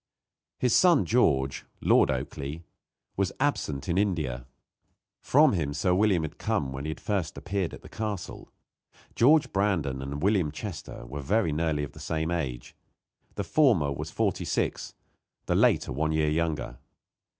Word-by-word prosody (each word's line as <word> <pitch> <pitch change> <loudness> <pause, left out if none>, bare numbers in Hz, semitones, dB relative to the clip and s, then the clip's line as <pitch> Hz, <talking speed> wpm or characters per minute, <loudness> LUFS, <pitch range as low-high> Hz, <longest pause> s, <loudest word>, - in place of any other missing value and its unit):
His 125 -2 +2
son 175 -6 +5
George, 70 - +2 0.2
Lord - - +4
Oakleigh, 75 +5 -4 0.5
was 100 -1 0
absent 95 - -1
in 90 +1 +1
India. 75 -12 -1 0.7
From 145 0 +4
him 75 -6 -1
Sir 90 +5 +1
William 95 -3 +3
had 80 - -6
come 65 - -1
when 65 +2 -6
he 80 - -2
first 95 -7 -3
appeared 95 -4 -2
at - - -11
the - - -11
castle. 105 -4 -5 0.6
George 150 +6 +4
Brandon 85 -10 0
and 70 +3 -5
William 95 -7 +2
Chester 90 - -7
were 70 +4 -6
very 100 +3 +1
nearly 75 -1 0
of 70 - -6
the - - -13
same 80 +1 -2
age. 65 -8 -4 0.6
The - - -2
former 110 - +3
was - - -5
forty - - -1
six, - - -2 0.5
the - - 0
later - - +3
one 80 +4 0
year 80 -1 +1
younger. 75 -6 -2
80 Hz, 150 wpm, -27 LUFS, 70-100 Hz, 0.7 s, son